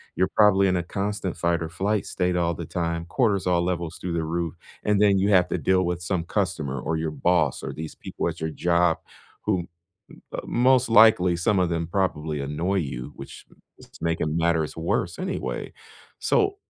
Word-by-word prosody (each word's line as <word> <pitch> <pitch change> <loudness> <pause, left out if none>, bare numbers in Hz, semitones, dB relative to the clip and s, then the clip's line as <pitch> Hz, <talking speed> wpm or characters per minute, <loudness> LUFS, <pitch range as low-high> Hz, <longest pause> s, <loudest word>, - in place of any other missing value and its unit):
You're 95 - +1
probably 100 -2 +5
in 95 - +2
a 90 - +1
constant 100 0 -3
fight 85 -1 +1
or 80 - -3
flight 100 +5 -1
state 90 -1 0
all 85 -1 +1
the - - -6
time, 85 -1 -2
cortisol 95 -4 +1
levels 85 -2 -3
through 90 -2 -4
the 85 -1 -1
roof, 85 0 -2 0.3
and 105 -1 +2
then 100 -2 +4
you 100 +2 +2
have 90 -3 +5
to - - 0
deal 95 0 +2
with 90 0 -2
some 90 -1 -1
customer 80 -8 -2
or 80 +5 -2
your 80 0 -2
boss 75 -1 +1
or - - -4
these 80 0 -7
people - - -4
at - - -5
your 80 - -1
job 85 +1 +2 0.5
who, 95 -5 0 0.7
uh, - - -3
most 130 +1 +3
likely, 110 -5 +6
some 95 +4 +1
of 90 -2 +2
them 85 -1 -1
probably 80 -5 -1
annoy 80 +8 -1
you, 70 -5 -3
which 70 - -10 0.3
is - - -16
making 80 -2 -1
matters 80 -2 +1
worse 85 +1 -1
anyway. 190 0 -4 0.5
So, 405 -3 +2
85 Hz, 185 wpm, -25 LUFS, 80-95 Hz, 0.7 s, likely